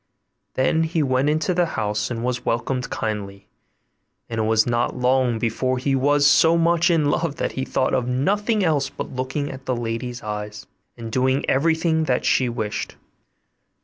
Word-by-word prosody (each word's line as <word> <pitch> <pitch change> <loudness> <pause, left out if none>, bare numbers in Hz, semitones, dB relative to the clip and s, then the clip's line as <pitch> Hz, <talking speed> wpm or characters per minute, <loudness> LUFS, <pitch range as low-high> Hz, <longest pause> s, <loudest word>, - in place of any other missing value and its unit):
Then 130 +5 +2
he 160 -1 0
went 130 +1 +1
into 155 +4 0
the 175 -1 +2
house, 105 -1 -1
and 120 -1 -4
was 125 0 -2
welcomed 125 +2 -2
kindly; 100 -3 -4 0.8
and 115 -1 -4
it - - +1
was 110 0 +3
not 120 +1 0
long 125 -1 +2
before 120 +3 -1
he 135 +2 -1
was 145 +2 +3
so 160 +3 +5
much 170 +1 +3
in 155 -4 +2
love 165 -3 -1
that - - -2
he 130 - -3
thought 130 - 0
of 125 -1 0
nothing 205 - +1
else 150 -5 +1
but - - -7
looking 130 +3 -3
at 135 0 -11
the 130 - 0
lady's 120 +1 -4
eyes, 105 -1 -6 0.3
and 115 -1 -7
doing 130 +2 +1
everything 160 +2 +2
that 125 -4 0
she 130 -2 +2
wished. 110 -3 -4
130 Hz, 175 wpm, -22 LUFS, 120-150 Hz, 0.8 s, so